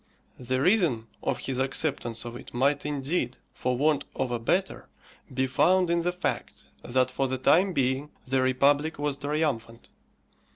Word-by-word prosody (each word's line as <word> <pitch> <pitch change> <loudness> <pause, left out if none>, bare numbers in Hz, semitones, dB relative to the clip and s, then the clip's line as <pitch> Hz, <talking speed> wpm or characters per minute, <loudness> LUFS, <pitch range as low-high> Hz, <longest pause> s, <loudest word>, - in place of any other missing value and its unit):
The 130 +1 -1
reason 160 - +3 0.2
of - - -1
his 130 -1 -3
acceptance 130 -4 -1
of 120 0 -6
it 120 - -11
might, 140 +4 +1
indeed, 140 -2 -1 0.2
for 125 -1 -1
want 150 +1 +2
of 125 - -1
a 120 - -1
better, 185 +11 -1 0.4
be 130 +1 0
found 180 +7 +3
in 170 0 +2
the 175 +1 0
fact 180 - -4 0.2
that 130 +1 +1
for 135 +1 0
the 130 0 -2
time 180 +9 +4
being 135 -1 0 0.2
the 130 0 +2
republic 140 +4 +2
was 145 -1 -1
triumphant. 140 -6 -2
135 Hz, 160 wpm, -27 LUFS, 130-155 Hz, 0.4 s, time